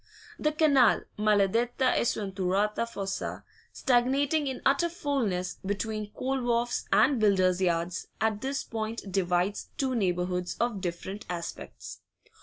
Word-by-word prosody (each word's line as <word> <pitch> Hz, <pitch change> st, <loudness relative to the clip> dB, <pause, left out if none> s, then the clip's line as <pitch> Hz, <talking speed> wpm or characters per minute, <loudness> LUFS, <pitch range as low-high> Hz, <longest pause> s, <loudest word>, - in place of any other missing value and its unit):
The 305 Hz, -, +1 dB
canal 285 Hz, -6 st, +4 dB, 0.2 s
maladetta 215 Hz, +5 st, +2 dB
e -, -, +2 dB
sventurata 200 Hz, +1 st, 0 dB
fossa 195 Hz, -3 st, -4 dB, 0.3 s
stagnating 275 Hz, +4 st, +2 dB
in 265 Hz, -, -3 dB
utter 280 Hz, +6 st, +3 dB
foulness 235 Hz, -, -2 dB
between 210 Hz, +2 st, -3 dB
coal 265 Hz, +3 st, -2 dB
wharfs 240 Hz, 0 st, 0 dB
and 225 Hz, +6 st, +4 dB
builders' 190 Hz, -3 st, +3 dB
yards, 175 Hz, 0 st, 0 dB
at 220 Hz, -1 st, 0 dB
this 270 Hz, +1 st, -2 dB
point 220 Hz, -2 st, -5 dB
divides 180 Hz, +1 st, 0 dB
two 265 Hz, -4 st, 0 dB
neighbourhoods 180 Hz, -4 st, -1 dB
of 230 Hz, -4 st, 0 dB
different 185 Hz, +3 st, -5 dB
aspects. 170 Hz, -1 st, -6 dB
215 Hz, 120 wpm, -28 LUFS, 190-255 Hz, 0.3 s, canal